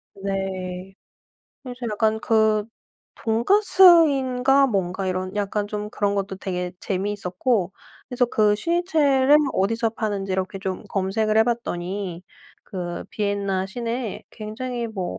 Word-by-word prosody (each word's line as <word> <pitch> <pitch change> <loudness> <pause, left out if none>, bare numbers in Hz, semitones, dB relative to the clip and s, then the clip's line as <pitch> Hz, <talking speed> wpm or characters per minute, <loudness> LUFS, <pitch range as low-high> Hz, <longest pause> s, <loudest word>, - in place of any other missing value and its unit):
네. 190 -1 -4 0.7
그래서 250 -2 -8
약간 220 +1 +1
그 220 -2 +2 0.5
돈가스인가 275 - +4
뭔가 190 -3 -1
이런 185 +1 -3
약간 205 0 -1
좀 210 0 -4
그런 205 -1 0
것도 195 -1 -3
되게 180 -2 -4
재미있었고 195 +1 -1 0.4
그래서 250 -1 +1
그 210 -3 +2
슈니첼을 295 - +3 0.2
어디서 225 +4 +1
파는지 205 -4 -3
이렇게 190 +1 -2
좀 190 -1 -4
검색을 215 +3 0
해 220 - +6
봤더니 190 -6 -3 0.4
그 175 -2 -5
비엔나 200 -2 -1
시내에 235 +2 -4
굉장히 235 +2 -5
뭐 185 - -5
210 Hz, 260 characters per minute, -23 LUFS, 190-240 Hz, 0.7 s, 해